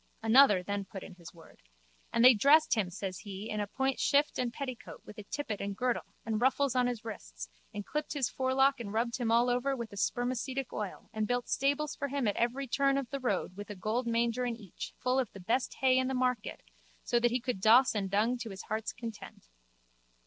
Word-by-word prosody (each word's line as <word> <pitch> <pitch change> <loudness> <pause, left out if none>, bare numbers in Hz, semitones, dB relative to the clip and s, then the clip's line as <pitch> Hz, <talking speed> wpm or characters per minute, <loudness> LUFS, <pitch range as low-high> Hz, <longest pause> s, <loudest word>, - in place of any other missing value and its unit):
Another 225 -5 +6
then 200 +1 -2
put 195 0 -9
in - - -10
his 170 -2 -12
word: 165 -2 -17 0.5
And 230 - +4
they 255 - +10
dressed 285 +8 +5
him, 210 -7 0
says 185 +1 -5
he, 200 +1 -7
in 215 - -2
a 205 - -1
point 265 +4 -1
shift 285 +1 +2
and 245 -2 0
petticoat 255 -1 -7
with 210 - -11
a - - -7
tippet 225 -4 -4
and 200 -1 -4
girdle 250 -1 -2
and 220 0 -1
ruffles 265 +1 +2
on 250 -1 +3
his 240 -2 -4
wrists - - -7 0.2
and 205 -1 -6
clipped 300 0 -3
his 280 -4 0
forelock 265 +1 +2
and 215 -4 -5
rubbed 235 +1 0
him 235 -3 -1
all 235 +2 +4
over 250 +3 +1
with 235 -3 -6
spermacetic 255 +3 -2
oil 210 +1 -6
and 215 -1 -1
built 245 +1 -1
stables 285 +3 0
for 280 - -3
him 275 -3 -1
at 205 - +1
every 250 +4 0
turn 275 +2 +2
of 270 -4 -3
the 275 - -2
road 200 -7 -1
with 205 +1 -8
a 210 - -6
gold 220 +6 -2
manger 235 +1 +1
in 240 -1 -1
each 205 -6 -9
full 255 +1 +1
of 250 -5 -1
the 195 - -10
best 230 +8 -1
hay 260 -1 +5
in 260 - 0
the 265 - -1
market 250 -3 -1 0.4
so 240 - +2
that 240 0 +3
he 245 +2 0
could 240 -5 -3
doss 235 +5 +6
and 200 -3 -2
dung 220 +5 +1
to 235 -2 -5
his 190 -1 -8
heart's 220 +1 -2
content. 225 - -9
240 Hz, 225 wpm, -31 LUFS, 210-260 Hz, 0.5 s, they